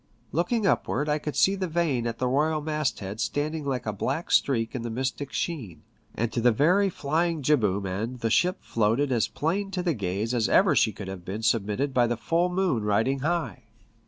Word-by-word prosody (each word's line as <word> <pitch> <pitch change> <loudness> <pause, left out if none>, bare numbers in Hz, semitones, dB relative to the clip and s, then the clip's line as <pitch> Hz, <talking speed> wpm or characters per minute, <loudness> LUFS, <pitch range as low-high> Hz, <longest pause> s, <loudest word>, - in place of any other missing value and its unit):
Looking 200 - 0
upward 145 -6 +1
I 150 +1 +1
could 150 0 -5
see 195 - +4
the 190 -2 -2
vane 155 -8 0
at 115 - -4
the 125 - 0
royal 155 +4 +1
mast 150 -5 -2
head 100 +2 -6
standing 145 +8 -2
like 130 -3 -2
a 110 - -2
black 135 - -3
streak 115 -5 +2
in 125 - -3
the 120 - -4
mystic 130 +4 -3
sheen, 130 - -4 0.3
and 115 0 -1
to 120 - 0
the 120 +1 +5
very 180 - +3
flying 165 0 -1
jibboom 105 -9 +2
end 110 +7 -4
the 115 - 0
ship 180 - +2
floated 115 +6 +1
as 115 -4 +2
plain 195 +6 -2
to 185 -2 -3
the 170 -2 +1
gaze 100 +1 -2
as 115 -4 +1
ever - - +4
she - - +3
could 95 - -8
have 95 -2 -7
been 100 +5 -5
submitted 115 +5 0
by 120 -2 +3
the 120 0 -1
full 170 +8 +1
moon 180 - 0
riding 110 +6 +1
high. 170 +4 -2
130 Hz, 210 wpm, -26 LUFS, 115-160 Hz, 0.3 s, the